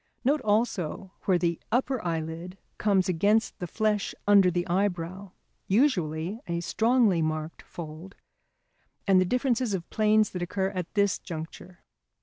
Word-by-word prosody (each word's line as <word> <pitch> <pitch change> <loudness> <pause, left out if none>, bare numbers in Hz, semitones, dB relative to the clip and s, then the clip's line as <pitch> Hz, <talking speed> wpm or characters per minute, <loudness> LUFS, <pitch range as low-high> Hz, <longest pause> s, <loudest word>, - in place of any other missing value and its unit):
Note 285 +3 +3
also 205 -4 -1
where 185 -2 +4
the 170 -1 -1
upper 255 +1 0
eyelid 165 +2 -4 0.2
comes 195 -3 +2
against 205 +5 +1
the 180 - -4
flesh 210 +2 0
under 200 -2 +6
the 175 0 -1
eyebrow 185 0 -2 0.4
(usually 190 - +1
a 170 0 -1
strongly 220 -1 +2
marked 155 0 -3
fold) 165 +3 -9 0.9
and 190 -2 +5
the - - +2
differences 250 0 +1
of 175 -2 -6
planes 215 -1 +3
that 180 - -5
occur 190 +2 -1
at 180 -3 -4
this 200 -2 +2
juncture. 170 +2 -8
190 Hz, 135 wpm, -27 LUFS, 170-215 Hz, 0.9 s, under